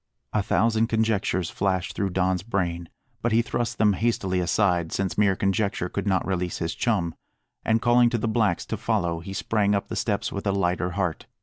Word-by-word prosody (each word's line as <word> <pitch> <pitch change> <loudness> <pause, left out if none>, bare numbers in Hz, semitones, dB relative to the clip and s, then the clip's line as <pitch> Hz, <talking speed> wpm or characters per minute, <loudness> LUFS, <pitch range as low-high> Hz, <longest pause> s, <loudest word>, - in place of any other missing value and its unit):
A 105 - +2
thousand 110 +3 +2
conjectures 110 -6 0
flashed 95 -2 -1
through 100 -1 0
Don's 95 0 0
brain, 85 -5 -2 0.3
but 120 - 0
he 115 +1 +4
thrust 120 0 -2
them 105 -2 +4
hastily 100 -3 0
aside, 90 -2 +1
since 100 -1 -1
mere 100 -2 +3
conjecture 95 -2 0
could - - -3
not 95 -2 +1
release 90 -2 -2
his 80 0 -2
chum; 100 -9 0 0.5
and 110 0 +1
calling 120 0 +5
to 120 - 0
the 115 - -1
blacks 110 -5 +1
to - - -3
follow, 90 -7 0
he 85 +4 -8
sprang 105 0 +1
up 100 - -2
the - - -4
steps - - -1
with 100 +1 -4
a - - +3
lighter 90 -2 0
heart. 90 -5 -2
100 Hz, 195 wpm, -25 LUFS, 90-110 Hz, 0.5 s, calling